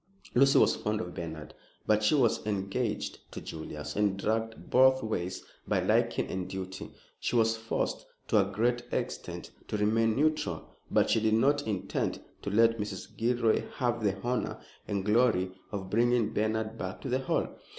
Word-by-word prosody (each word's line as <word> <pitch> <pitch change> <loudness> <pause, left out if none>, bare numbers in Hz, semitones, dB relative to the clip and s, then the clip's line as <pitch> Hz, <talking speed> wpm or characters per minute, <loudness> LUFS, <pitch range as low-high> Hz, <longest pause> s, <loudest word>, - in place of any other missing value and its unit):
Lucy 135 +2 +5
was - - +5
fond 105 0 -1
of 90 -4 -5
Bernard, 80 -2 -6 0.3
but 110 0 +3
she 105 - +4
was 125 -6 +2
engaged 105 +3 -2
to - - -6
Julius, 75 -2 -7
and, 100 -2 +2
dragged 110 +2 -2
both 130 0 +5
ways 95 -4 -3 0.2
by - - +2
liking - - +2
and 95 -1 -4
duty, 95 0 -6 0.3
she - - -1
was 115 -1 +4
forced 115 0 -2 0.2
to 110 - +4
a 100 0 -2
great 120 +4 +1
extent - - -4 0.2
to - - -2
remain 110 +2 +2
neutral. 145 - 0
But - - +3
she - - +4
did 110 0 +2
not 145 +4 +2
intend 100 -3 -2 0.2
to - - -3
let 115 +2 +4
Mrs. 105 -2 -5
Gilroy 115 -1 +1
have 120 -2 0
the 95 -2 0
honor 125 +1 -1 0.3
and 100 -2 -2
glory 105 -4 +3 0.2
of 95 -2 -5
bringing 120 0 +2
Bernard 110 +1 -1
back 95 0 -5
to 135 - -5
the 130 +1 +1
Hall. 130 - 0
110 Hz, 170 wpm, -30 LUFS, 95-120 Hz, 0.3 s, Lucy